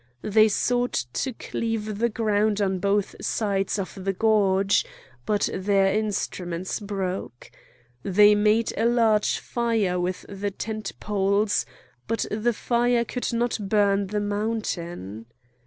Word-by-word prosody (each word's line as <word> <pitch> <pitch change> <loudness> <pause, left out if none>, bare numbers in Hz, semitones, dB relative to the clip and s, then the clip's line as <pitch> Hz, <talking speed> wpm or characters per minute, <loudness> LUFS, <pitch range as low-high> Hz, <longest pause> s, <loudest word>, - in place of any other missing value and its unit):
They 215 +1 +5
sought 245 - 0
to 265 - -1
cleave 220 -2 -3
the 235 +1 +2
ground 215 -1 +1
on 190 -2 0
both 200 +1 0
sides 200 -2 0
of 195 -1 -5
the 195 0 0
gorge, 200 -2 +3 0.4
but 205 -1 +2
their 195 0 +2
instruments 190 -4 -2
broke. 190 - -5 0.5
They 205 +6 +5
made 215 +2 +2
a 225 - +1
large 225 -3 +3
fire 225 -7 0
with 180 +1 -3
the 200 +1 -3
tent 215 +2 -5
poles, 205 0 +1 0.4
but 225 -1 -1
the 220 +3 +1
fire 240 +1 +1
could 250 +2 -3
not 235 0 0
burn 200 -1 +2
the 210 +1 -2
mountain. 175 - -3
205 Hz, 125 wpm, -25 LUFS, 195-220 Hz, 0.5 s, They